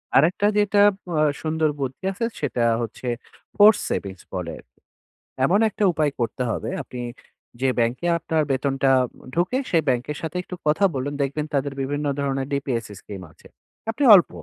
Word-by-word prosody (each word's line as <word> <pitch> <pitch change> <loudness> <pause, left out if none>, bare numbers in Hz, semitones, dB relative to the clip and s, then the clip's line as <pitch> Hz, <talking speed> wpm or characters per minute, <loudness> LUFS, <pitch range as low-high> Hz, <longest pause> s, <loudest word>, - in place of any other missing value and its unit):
আরেকটা 170 +8 +4
যেটা 205 0 +3
আব 200 - -5 0.2
অ্যা 155 -2 +2 0.2
সুন্দর 160 0 +1
বুদ্ধি 135 +2 -4
আছে 200 +4 -2 0.2
সেটা 135 -4 -1 0.2
হচ্ছে, 115 +2 -6 0.5
force 210 0 +7
savings 95 -2 -4
বলে 90 -3 -3
আরকি। - - -22 0.7
এমন 185 +8 +3
একটা 210 - -3
উপায় 155 -3 +1
করতে 120 +1 -2
হবে 110 +1 -3
আপনি, 125 - -9 0.6
যে 135 - +3
ব্যাংকে 120 +7 0
আপনার 160 -1 0
বেতনটা 135 0 +1 0.5
ঢুকে, 180 +9 +1
সেই 165 -2 +3
ব্যাংকের 130 +4 -1
সাথে 165 +2 -4
একটু 180 - -7
কথা 155 +7 +3
বলুন। 135 +2 -2
দেখবেন 145 +2 -2
তাদের 140 0 0
বিভিন্ন 145 +2 -2
ধরনের 135 -1 -1
DPS 130 -4 -1
scheme 100 -3 -9
আছে। - - -19 0.4
আপনি 285 - -2
অল্প, 180 - +4
145 Hz, 160 wpm, -23 LUFS, 130-170 Hz, 0.7 s, force